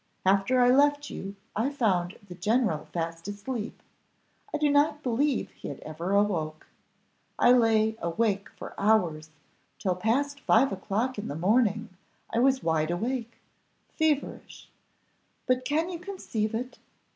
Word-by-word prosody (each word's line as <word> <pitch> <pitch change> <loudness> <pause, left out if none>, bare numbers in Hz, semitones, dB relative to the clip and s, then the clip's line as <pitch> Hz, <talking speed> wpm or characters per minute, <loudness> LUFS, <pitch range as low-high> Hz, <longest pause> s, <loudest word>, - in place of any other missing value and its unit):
After 195 +7 +3
I 245 0 +6
left 290 +2 +3
you 195 +1 -6 0.2
I 230 +6 +1
found 195 -10 0
the 180 - -8
general 210 -4 0
fast 165 0 -4
asleep, 210 +3 -5 0.7
I - - -1
do 300 0 +2
not 295 +1 +2
believe 260 +2 0
he - - -10
had 140 - -6
ever 165 +5 -4
awoke 170 -7 0 0.7
I - - +5
lay 220 -3 +4
awake 200 +3 0
for - - -8
hours, 170 -8 +2 0.5
till 190 -4 0
past 275 +9 0
five 270 0 +4
o'clock 205 +6 -2
in 205 - -5
the 145 - -4
morning, 215 +4 +2 0.4
I 230 - +1
was 265 +1 +3
wide 160 -1 +1
awake 230 +6 -2 0.6
feverish. 310 -3 -1 0.8
But 255 0 +1
can 320 +5 0
you 340 - -5
conceive 240 - -3
it? 250 +3 -5
220 Hz, 140 wpm, -28 LUFS, 190-260 Hz, 0.8 s, I